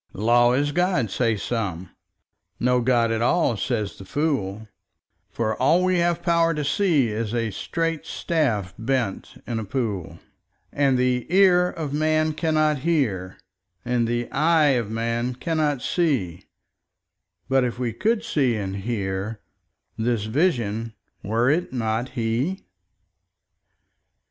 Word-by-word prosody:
Law 120 +4 +3
is 145 +3 +1
God, 175 - +1
say 115 0 +1
some: 95 -5 -3 0.7
no 125 0 +2
God 120 -2 +2
at 115 0 -1
all, 125 0 +2
says 105 0 -3
the - - -8
fool; 110 -5 -2 0.6
For 110 -1 -1
all 165 +7 +4
we 185 -1 +2
have 170 0 0
power 170 -1 +2
to 150 -1 -2
see 155 - +2
is 110 +1 -3
a 115 -2 -1
straight 165 - -3
staff 115 - -1
bent 120 -3 -2
in 115 -2 -3
a - - -3
pool; 100 -7 -3 0.6
And 140 -2 +2
the 125 -1 0
ear 180 -1 +5
of 155 -5 -5
man 155 +1 +1
cannot 155 -1 +1
hear, 125 - -1 0.5
and 120 -1 +1
the 120 0 -1
eye 155 +1 +3
of 120 -6 +1
man 115 +2 -2
cannot 150 -2 -1
see; 125 - -1 1.0
But 135 -1 +3
if 125 -1 -2
we 120 -3 -2
could 220 +1 0
see 140 - +1
and 100 -2 -3
hear, 100 0 -3 0.6
this 115 -2 0
Vision—were 115 - -1
it 175 +4 0
not 115 0 -1
He? 120 - -1
125 Hz, 130 wpm, -24 LUFS, 110-155 Hz, 1.0 s, ear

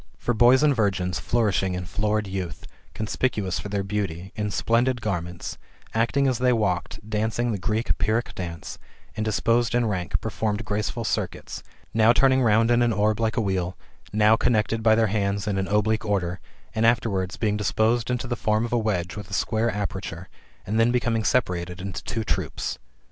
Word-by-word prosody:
For 120 - -1
boys 120 +4 +5
and 145 -2 +4
virgins, 95 -5 0
flourishing 100 -5 +1
in 90 0 -4
florid 105 +2 0
youth, 95 -3 -5 0.3
conspicuous 105 -3 -1
for 105 - -6
their 100 -1 -1
beauty, 95 -3 -3
in 105 -1 -2
splendid 120 +4 +1
garments, 90 -6 -4 0.3
acting 120 +5 +2
as 130 -3 0
they 125 0 +3
walked, 105 -2 -1
dancing 110 +2 0
the 105 - -2
Greek 110 +4 0
Pyrrhic 110 +3 0
dance,^^ 85 -3 -6 0.4
and 110 - -2
disposed 115 +3 +1
in 120 -1 +3
ranks, 95 -5 -2
performed 105 0 -2
graceful 105 +3 -2
circuits; 110 - -3 0.3
now 110 +1 +5
turning 130 +3 +4
round 115 0 +4
in 120 0 +4
an 120 -1 +3
orb 105 +1 +1
like 110 +1 0
a - - +3
wheel, 95 -3 -1 0.3
now 105 +1 +5
connected 115 -1 +1
by 110 0 +5
their 115 0 +3
hands 100 -1 0
in 100 -2 0
an 95 - -1
oblique 105 +2 +1
order, 90 -4 -1 0.3
and 110 - 0
afterwards, 105 -6 +1
being 105 -2 0
disposed 110 +3 +1
into 125 0 -1
the 120 0 -2
form 110 0 +1
of 120 - -5
a 120 - +3
wedge 95 -5 -1
with 105 -2 -8
a - - -9
square 110 +3 +1
aperture, 95 -3 -4 0.4
and 110 +4 0
then 115 +1 +5
becoming 120 -2 +1
separated 90 -6 0
into 95 0 -5
two 115 - -2
troops. - - -2
110 Hz, 180 wpm, -25 LUFS, 95-115 Hz, 0.4 s, boys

